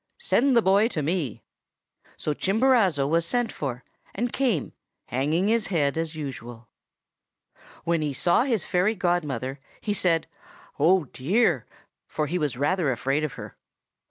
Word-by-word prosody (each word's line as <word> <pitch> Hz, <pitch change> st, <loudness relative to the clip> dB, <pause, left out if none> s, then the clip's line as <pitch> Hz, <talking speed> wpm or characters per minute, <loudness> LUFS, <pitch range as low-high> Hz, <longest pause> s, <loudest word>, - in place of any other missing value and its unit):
Send 260 Hz, 0 st, +2 dB
the 230 Hz, -, +4 dB
boy 200 Hz, +3 st, +4 dB
to 160 Hz, -10 st, -3 dB
me!' 155 Hz, -, -2 dB, 0.7 s
"So 150 Hz, -, -2 dB
Chimborazo 195 Hz, -, +2 dB
was 165 Hz, +3 st, +2 dB
sent 245 Hz, +7 st, 0 dB
for, 130 Hz, -3 st, -5 dB, 0.3 s
and 240 Hz, +4 st, -2 dB
came, 240 Hz, -, 0 dB, 0.3 s
hanging 150 Hz, +9 st, 0 dB
his 225 Hz, 0 st, +2 dB
head 145 Hz, -7 st, +1 dB
as 165 Hz, 0 st, -3 dB
usual. 120 Hz, -6 st, -7 dB, 1.1 s
When 170 Hz, -1 st, +1 dB
he 150 Hz, -1 st, -1 dB
saw 175 Hz, -, +2 dB
his 230 Hz, -, 0 dB
fairy 190 Hz, +4 st, +1 dB
godmother, 150 Hz, -, -1 dB, 0.2 s
he 210 Hz, -, -2 dB
said, 170 Hz, -5 st, +1 dB, 0.5 s
'Oh, 175 Hz, +4 st, +4 dB
dear!' 175 Hz, -, +1 dB, 0.4 s
for 155 Hz, -, -2 dB
he 175 Hz, +5 st, -2 dB
was 145 Hz, -5 st, -1 dB
rather 150 Hz, +1 st, +1 dB
afraid 135 Hz, +5 st, 0 dB
of 150 Hz, -3 st, -2 dB
her. -, -, -9 dB
165 Hz, 145 wpm, -25 LUFS, 140-200 Hz, 1.1 s, the